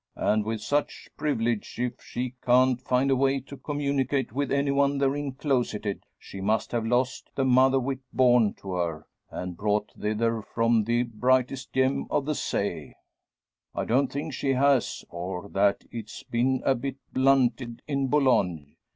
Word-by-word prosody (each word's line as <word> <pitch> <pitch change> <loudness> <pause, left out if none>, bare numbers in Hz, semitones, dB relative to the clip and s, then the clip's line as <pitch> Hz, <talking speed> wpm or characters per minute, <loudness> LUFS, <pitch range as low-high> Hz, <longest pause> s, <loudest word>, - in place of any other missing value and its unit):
And 110 0 +2
with 110 -1 -3
such 145 +8 -2
privilege, 120 -7 -1
if 125 0 -3
she 125 0 -4
can't 125 0 +4
find 130 +1 +1
a - - +4
way 135 +1 +2
to 140 +2 -10
communicate 140 -4 -1
with 140 +2 -1
any 140 0 +2
one 140 0 +2
therein 140 0 0
closeted, 125 -7 -2
she 95 - -9
must 110 +3 0
have 115 -2 -1
lost 125 +2 0
the 135 - +1
mother 130 +1 +5
wit 130 +1 -2
born 120 -4 +4
to 95 - -8
her, 85 -3 -2 0.2
and 90 -1 -5
brought 105 +2 0
thither 110 +2 -1
from 115 0 +1
the 120 +2 +2
`brightest 125 +3 0
gem 130 +1 +1
of 140 - 0
the 150 - 0
say.' - - -3 0.8
I - - -1
don't 130 +2 +2
think 145 +2 -4
she 135 0 0
has, 135 -1 +2
or 90 +2 -5
that 100 0 +2
it's 110 -2 -7
been 125 +2 0
a 135 - +4
bit 135 +1 -4 0.2
blunted 125 -3 +2
in 140 -2 0
Boulogne. 100 - +1
125 Hz, 160 wpm, -27 LUFS, 110-135 Hz, 0.8 s, mother